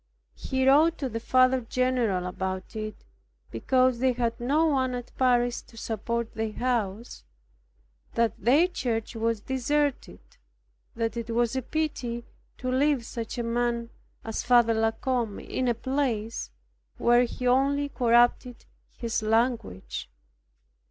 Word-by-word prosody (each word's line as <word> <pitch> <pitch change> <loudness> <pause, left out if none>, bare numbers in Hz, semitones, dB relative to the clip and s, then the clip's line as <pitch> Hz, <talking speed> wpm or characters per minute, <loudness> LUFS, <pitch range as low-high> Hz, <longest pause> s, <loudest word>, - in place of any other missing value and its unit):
He 265 0 -1
wrote 310 +5 +5
to 270 - -3
the 230 0 -4
Father 255 +2 +3
general 235 -6 0
about 185 +2 -4
it, 215 0 -6 0.5
because 255 -2 +2
they 260 0 +2
had 235 -1 -1
no 285 +7 +2
one 260 -5 +1
at 245 -1 -8
Paris 245 -2 +2
to 230 - -19
support 230 +1 -3
their 220 -1 -3
house, 235 -3 -2 0.9
that 230 -1 +2
their 285 +9 +5
church 235 -11 -3
was 225 -1 -1
deserted; 275 +3 -1 0.8
that 230 0 -2
it 235 0 -4
was 235 +1 +1
a 260 - 0
pity 245 -5 -3 0.3
to 255 -1 -3
leave 270 -2 +2
such 230 +1 -6
a 240 - -1
man 235 0 -1 0.3
as 225 -1 -3
Father 240 -2 +4
La 225 0 +2
Combe 230 -2 -2
in 255 - -3
a 240 - +2
place 235 - -2 0.5
where 240 +1 +4
he 250 +1 -6
only 275 +3 +2
corrupted 240 0 +2 0.3
his 230 -2 -2
language. 225 - -1
240 Hz, 135 wpm, -27 LUFS, 230-260 Hz, 0.9 s, wrote